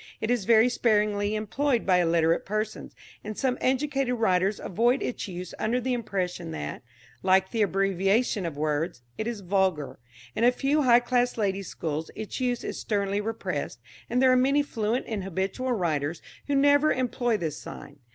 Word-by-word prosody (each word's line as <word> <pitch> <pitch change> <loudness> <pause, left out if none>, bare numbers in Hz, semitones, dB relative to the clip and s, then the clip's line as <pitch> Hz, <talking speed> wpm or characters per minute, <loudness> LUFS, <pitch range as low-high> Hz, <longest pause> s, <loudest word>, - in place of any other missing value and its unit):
It 220 - -1
is 240 -6 0
very 230 +1 +6
sparingly 210 -3 +1
employed 235 +4 0
by 180 -2 +4
illiterate 165 -1 +2
persons, 215 +1 -4 0.3
and 215 0 -6
some 260 -2 +1
educated 270 -1 +1
writers 195 -3 +1
avoid 240 +7 +1
its 245 - -3
use 180 -1 -7
under 235 +3 +1
the 255 +1 -1
impression 185 -7 -3
that, 160 - -5 0.4
like 190 0 +3
the 230 - 0
abbreviation 195 +3 +1
of 150 -4 -6
words, 150 -2 -2 0.2
it 220 - -2
is 235 -4 -4
vulgar. 185 -6 0 0.4
In 225 - 0
a 245 - +6
few 280 +4 +1
high 245 -3 +5
class 245 0 +1
ladies' 195 -3 -1
schools 155 0 -4
its 220 +3 -5
use 245 -2 -1
is - - -4
sternly 200 -1 -1
repressed, 225 +1 -4 0.3
and 245 - +1
there 260 0 +5
are - - +5
many 275 +3 +3
fluent 230 -2 -2
and 210 -4 -3
habitual 195 +8 -2
writers 160 -6 -1 0.2
who 285 - +1
never 285 +2 +4
employ 245 -2 0
this 155 -5 -4
sign. 145 0 -10
215 Hz, 170 wpm, -27 LUFS, 185-245 Hz, 0.4 s, very